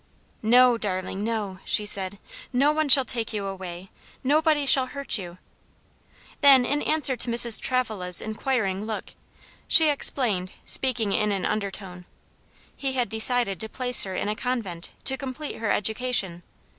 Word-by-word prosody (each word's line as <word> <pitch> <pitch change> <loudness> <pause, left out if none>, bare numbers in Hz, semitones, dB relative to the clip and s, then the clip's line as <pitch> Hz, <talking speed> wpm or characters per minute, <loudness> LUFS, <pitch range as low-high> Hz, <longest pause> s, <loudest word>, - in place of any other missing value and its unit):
"No, 245 +1 +4
darling, 190 -1 -5
no," 210 -4 -4
she 210 - +2
said, 195 -1 0 0.3
"no 275 +4 +2
one 310 -1 -2
shall 265 0 +8
take 230 -3 -3
you 205 -2 -4
away; 185 -1 -8 0.3
nobody 300 +1 +1
shall 265 -1 +5
hurt 280 -4 -1
you." 175 -2 -10 1.0
Then 270 -3 +5
in 290 +3 -1
answer 295 -4 +1
to 240 0 -1
Mrs. 235 -1 +4
Travilla's 215 -8 +2
inquiring 215 -3 -3
look, 220 -1 -7 0.5
she 320 -2 +7
explained, 225 -10 0
speaking 245 -6 0
in 210 +1 0
an 195 -2 -3
undertone: 195 -3 -5 0.7
"He 270 -1 -4
had 250 -2 -2
decided 220 -3 +2
to 220 - -4
place 250 +1 +2
her 190 -1 -6
in - - -3
a 210 - -2
convent, 215 -9 -5
to 265 - +1
complete 275 +2 -7
her 225 - -4
education. 215 -5 -1
225 Hz, 150 wpm, -24 LUFS, 195-260 Hz, 1.0 s, shall